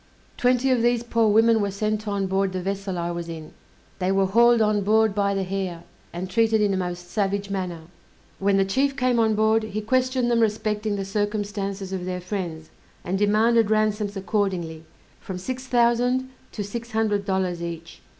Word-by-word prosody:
Twenty 250 +1 +2
of 250 -2 +2
these 240 0 +2
poor 230 -1 +2
women 225 +1 +4
were 200 - 0
sent 215 +2 -2
on 200 -1 -1
board 190 0 0
the 185 - -2
vessel 195 -1 -3
I 170 0 -2
was 170 -1 -5
in; 160 -2 -8 0.5
they 185 0 +1
were 195 0 +3
hauled 235 +4 +5
on 210 -1 +2
board 220 +1 +3
by 200 -1 +1
the 195 - 0
hair, 185 -3 -4 0.3
and 175 +2 -5
treated 225 +3 +2
in 205 -2 +2
a - - +1
most 175 -1 -4
savage 200 -1 -1
manner. 180 -4 -3 0.6
When 195 0 +2
the 195 - +3
chief 270 +7 0
came 250 -2 +2
on 220 -1 +3
board, 220 +1 +3
he 215 -1 -4
questioned 255 +2 +1
them 235 - +3
respecting 215 -1 0
the 195 -1 -3
circumstances 205 -1 -3
of 180 -2 -3
their 180 0 -3
friends, 175 -4 -5 0.3
and 180 - -2
demanded 215 +2 +3
ransoms 215 -1 0
accordingly, 185 -5 -2 0.3
from 190 - -6
six 255 +7 -5
thousand 245 +1 +2 0.2
to 210 - -3
six 230 +3 -7
hundred 215 -2 +1
dollars 190 -3 -1
each. 170 -1 -7
205 Hz, 185 wpm, -24 LUFS, 190-225 Hz, 0.6 s, hauled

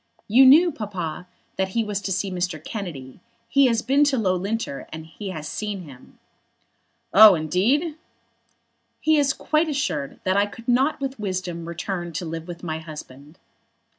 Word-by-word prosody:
"You 260 +5 +7
knew, 330 +6 +7
Papa, 180 - -5 0.3
that 190 0 0
he 230 - +3
was 205 -2 -3
to 195 - -4
see 195 +1 -1
Mr. 180 -3 -2
Kennedy. 160 - -7 0.3
He 275 +3 +4
has 230 -2 +1
been 275 +2 +3
to 280 -2 +1
Loughlinter, 195 - -2
and 160 0 -7 0.3
has 155 -3 -6
seen 205 +2 -4
him." 135 -5 -15 1.0
"Oh, 210 -1 +9
indeed!" 230 - 0 1.0
"He 315 -1 +3
is 280 -1 +3
quite 310 +3 0
assured 210 - -2
that 185 0 +1
I 200 0 +3
could 230 +3 -13
not 265 +5 +2
with 270 -3 -4
wisdom 180 -4 -4
return 175 0 -4
to 175 - -4
live 165 +1 -6
with 175 0 -9
my 160 -2 -3
husband." 150 -1 -11
190 Hz, 160 wpm, -23 LUFS, 165-245 Hz, 1.0 s, Oh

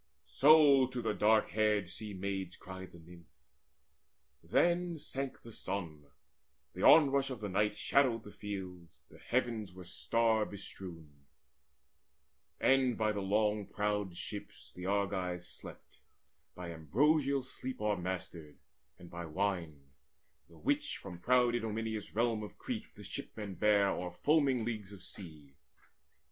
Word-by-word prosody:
So 145 -2 +6
to 125 -1 -5
the - - 0
dark 110 +1 +3
haired 105 -3 +2
Sea 105 +3 -7
maids 95 -1 -3
cried 95 0 -9
the - - -13
Nymph. 85 0 -15 1.1
Then 175 - +2
sank 135 -2 -5
the 115 - -10
sun: 85 -8 -5 0.7
the - - -6
onrush 140 -3 +6
of 130 -4 -5
the 105 -2 -4
night 105 +3 +1
Shadowed 125 -5 +2
the 105 - -10
fields, 95 -5 -7
the - - -15
heavens 115 -6 -1
were 95 - -9
star 115 +4 +1
bestrewn; 85 -8 -9 1.3
And 130 -3 +3
by 110 -1 +2
the 100 -1 -3
long 105 +1 +1
prowed 105 -3 -1
ships - - -8
the 90 +1 -6
Argives 95 -3 -1
slept - - -10 0.6
By 90 -1 -6
ambrosial 135 - +2
sleep 130 0 -6
o'ermastered, 90 -6 -3 0.4
and 90 - -12
by 85 -1 -6
wine 80 -6 -2 0.6
The 85 - -17
which 75 - 0
from 90 -3 -9
proud 125 +3 +3
Idomeneus' 110 -2 -3
realm 115 -1 +1
of 105 - -8
Crete: - - -5
The - - -11
shipmen 105 -3 -6
bare 100 0 +4
o'er 90 -1 -2
foaming 140 -6 +3
leagues 105 -4 -4
of 95 - -12
sea. 75 -7 -11
105 Hz, 135 wpm, -33 LUFS, 90-120 Hz, 1.3 s, So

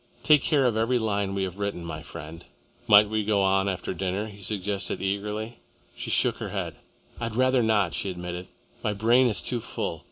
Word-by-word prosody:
Take 150 -3 +6
care 145 -4 +2
of 120 -3 +2
every 115 +3 +2
line 100 -3 -1
we 95 - 0
have 95 +1 -5
written, 100 -4 -3
my 85 - -5
friend." 80 +3 -9 0.4
"We - - -4
might 105 0 -2
go 100 -2 +3
on 95 +1 +3
after 95 0 -3
dinner," 95 +3 -2
he 105 -2 -11
suggested 100 -1 -2
eagerly. 105 +4 -3 0.4
She - - -5
shook - - +2
her - - -5
head. - - -3 0.5
"I'd 115 -2 -3
rather 130 0 +3
not," 105 -6 +2
she 100 - -2
admitted. 90 0 -5 0.4
"My 105 - 0
brain 120 +5 +4
is 110 - +1
too 125 - 0
full. - - -3
100 Hz, 195 wpm, -26 LUFS, 95-110 Hz, 0.5 s, Take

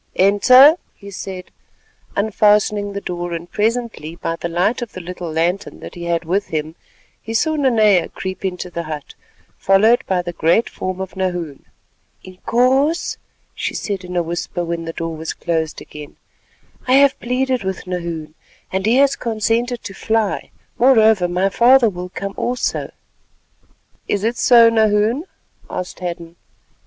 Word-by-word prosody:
"Enter," 255 - +6 0.2
he 200 0 -12
said, 185 -1 -7 0.6
unfastening 205 0 +2
the 200 - -4
door, 175 -1 -4
and 170 +1 -6
presently 220 -7 -2
by 165 -1 -3
the 170 - -5
light 180 +9 0
of 240 - -6
the - - -7
little 180 -1 -6
lantern 175 +5 -1
that - - -9
he 175 -1 -7
had 170 0 -1
with 195 +5 0
him, 155 0 -3 0.5
he 225 +1 -6
saw 315 +6 +1
Nanea 220 - +3
creep 190 0 -6
into 180 -1 -4
the 170 - -3
hut, 155 -3 -7 0.5
followed 220 +6 +4
by 180 -2 0
the 175 0 -5
great 170 +8 +2
form 185 0 -4
of 190 0 -6
Nahoon. 175 -6 -3 0.6
"Inkoos," 255 - +1 0.4
she - - -4
said 200 -3 -3
in 180 0 -7
a 175 - +1
whisper 170 +1 -4
when 170 0 -4
the 165 - -5
door 165 0 -4
was 160 +1 -5
closed 160 -2 -2
again, 150 -1 -11 0.7
"I 255 - +3
have 275 0 +5
pleaded 255 0 -1
with 190 0 -4
Nahoon, 170 -4 -5 0.4
and 190 +2 -1
he 230 - +4
has 275 +1 +4
consented 230 +2 -1
to 195 - -7
fly; 220 0 -1 0.3
moreover, 220 -7 +5
my 180 +2 +1
father 240 +2 +5
will 180 0 -7
come 195 +2 -5
also." 245 0 -2 1.2
"Is 200 -1 -1
it 230 +2 0
so, 235 -2 +6
Nahoon?" 220 - +2 0.4
asked 180 - -5
Hadden. 170 -1 -6
195 Hz, 155 wpm, -19 LUFS, 175-230 Hz, 1.2 s, Enter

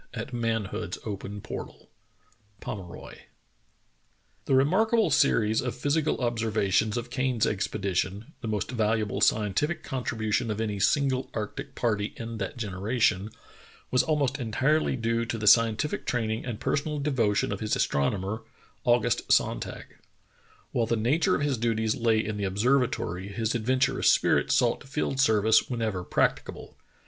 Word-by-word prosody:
At 115 +2 -6
manhood's 115 -3 -2
open 100 -1 -5
portal." - - -8 0.4
— 105 -2 -36
POMEROY. 95 -5 -8 1.2
THE 135 - +2
remarkable 200 - +3
series 110 -5 +3
of 125 -1 -3
physical 150 +4 0
observations 110 -2 +1
of 120 0 -5
Kane's 130 -4 +1
expedition, 100 - -2
the - - -5
most 105 +1 -2
valuable 110 -3 0
scientific 110 - +1
contribution 115 -3 -2
of 105 0 -2
any 105 -3 -2
single 135 +3 +1
arctic 105 -2 -5
party 105 -3 -1
in 115 -1 -6
that 100 +4 -4
generation, 105 -1 0 0.6
was 125 - +4
almost 140 -1 0
entirely 130 +6 +1
due 115 -1 0
to 115 0 -3
the 110 - -4
scientific 115 +6 +3
training 110 -2 -1
and 115 -3 -4
personal 150 +3 -1
devotion 125 -10 +1
of 100 - -3
his 110 -1 0
astronomer, 95 - 0 0.5
Au 120 0 +6
gust - - -1
Sonntag, - - +1 0.9
While 115 -2 0
the 115 - +1
nature 135 +9 +2
of - - -2
his 140 -5 0
duties 110 -1 +1
lay 115 -3 +1
in 105 0 -3
the 100 - -3
observatory, 100 -3 0
his 110 +3 -2
adventurous 125 +3 +2
spirit - - +2
sought - - +2
field 135 -1 -3
ser 110 -6 +4
vice 110 +1 +4
whenever 110 -7 -2
practicable. - - -1
115 Hz, 140 wpm, -27 LUFS, 105-130 Hz, 1.2 s, Au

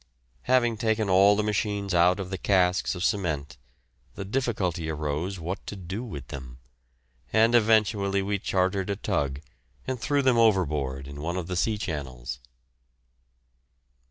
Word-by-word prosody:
Having 120 -3 +3
taken 110 -2 0
all 100 +2 +6
the 105 - 0
machines 105 -2 -1
out 90 +3 +4
of 95 -1 -5
the 95 - -2
casks 90 0 +2
of 90 - -4
cement, 80 -11 -1 0.6
the 100 - -5
difficulty 95 -8 -1
arose 75 +5 -2
what 90 +4 -5
to - - -5
do 95 +4 -5
with 75 - -8
them, 65 -2 -8 0.7
and 115 +2 +4
eventually 105 -4 +3
we 100 +1 -1
chartered 95 +1 0
a 100 - 0
tug 75 -10 -2 0.4
and 130 -3 -3
threw 145 -1 +1
them 130 -3 +4
overboard 75 -11 +1
in 70 +1 -8
one 85 +4 -2
of 90 - -3
the 90 +1 -4
sea 105 +5 +1
channels. 65 - -5
95 Hz, 150 wpm, -26 LUFS, 80-105 Hz, 0.7 s, all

